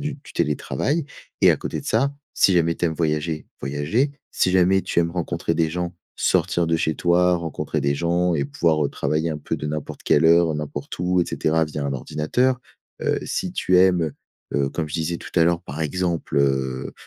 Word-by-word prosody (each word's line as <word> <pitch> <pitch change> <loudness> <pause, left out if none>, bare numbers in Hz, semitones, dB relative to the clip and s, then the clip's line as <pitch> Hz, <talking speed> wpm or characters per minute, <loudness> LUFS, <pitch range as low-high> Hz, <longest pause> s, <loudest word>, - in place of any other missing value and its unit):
du 150 0 -3
du - - -12
télétravail 85 - -1 0.4
et - - +8
à - - -1
côté - - -4
de - - -12
ça, 135 +6 +2 0.2
si 95 - +4
jamais 85 -1 +3
tu 85 - 0
aimes 80 - -1
voyager, 75 0 -1
voyager 75 - 0 0.2
si 95 - +2
jamais 95 +1 +4
tu - - -1
aimes 85 0 +2
rencontrer 85 -1 -2
des 80 -1 +1
gens, 90 +1 -3 0.2
sortir 85 -1 +1
de 80 0 +2
chez 80 -1 0
toi, 90 +1 +3
rencontrer 80 -2 -3
des 70 +1 +1
gens 85 +3 +1
et 70 -3 0
pouvoir, 75 +2 +1
heu, - - +1
travailler 80 +3 -1
un 75 - -3
peu - - -3
de - - -5
n'importe 75 -1 -5
quelle 75 - +3
heure, 85 0 +5
n'importe 75 -1 -5
où 90 +1 +2
et 85 - +2
cetera 80 +1 +1
via 75 -1 -5
un 70 - -1
ordinateur. 120 - 0 0.4
Heu, - - +1
si - - -3
tu 90 - +2
aimes, 90 -2 +5
heu 80 -3 -2 0.5
heu, 70 - -2
comme 80 0 -3
je 75 - -8
disais 85 +1 -1
tout - - -10
à 80 - +6
l'heure 85 0 +1
par 75 +3 -7
exemple, 85 -1 -2
heu 65 -2 0
85 Hz, 210 wpm, -23 LUFS, 75-90 Hz, 0.5 s, et